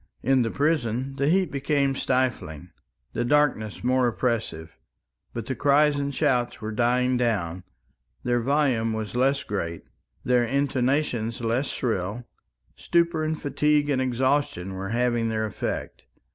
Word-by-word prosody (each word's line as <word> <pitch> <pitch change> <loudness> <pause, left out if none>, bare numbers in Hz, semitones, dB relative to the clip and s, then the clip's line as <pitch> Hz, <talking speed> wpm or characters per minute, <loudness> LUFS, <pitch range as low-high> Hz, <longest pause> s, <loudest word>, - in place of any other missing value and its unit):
In 130 +1 +3
the 115 - 0
prison 135 -3 0
the 140 +1 +2
heat 185 -1 +2
became 140 0 +1
stifling, 125 - -1 0.4
the 120 - -1
darkness 120 -6 +1
more 125 0 +3
oppressive, 110 -10 -2 0.6
but 115 -2 -5
the 130 - -2
cries 145 +4 +3
and 140 0 -1
shouts 130 -4 0
were 110 0 -4
dying 125 +3 +2
down; 95 -8 -1 0.6
their 120 0 +1
volume 130 -4 +1
was 110 -1 -4
less 135 +3 +2
great, 85 -5 -4 0.4
their 125 -1 +3
intonation 130 -2 0
less 120 +4 0
shrill; 110 0 -2 0.5
stupor 170 -2 +1
and 155 0 -2
fatigue 145 +1 +1
and 130 -2 +1
exhaustion 130 -7 0
were 95 +1 -5
having 120 0 +1
their 110 -1 -1
effect. 105 - -5
125 Hz, 135 wpm, -25 LUFS, 115-140 Hz, 0.6 s, In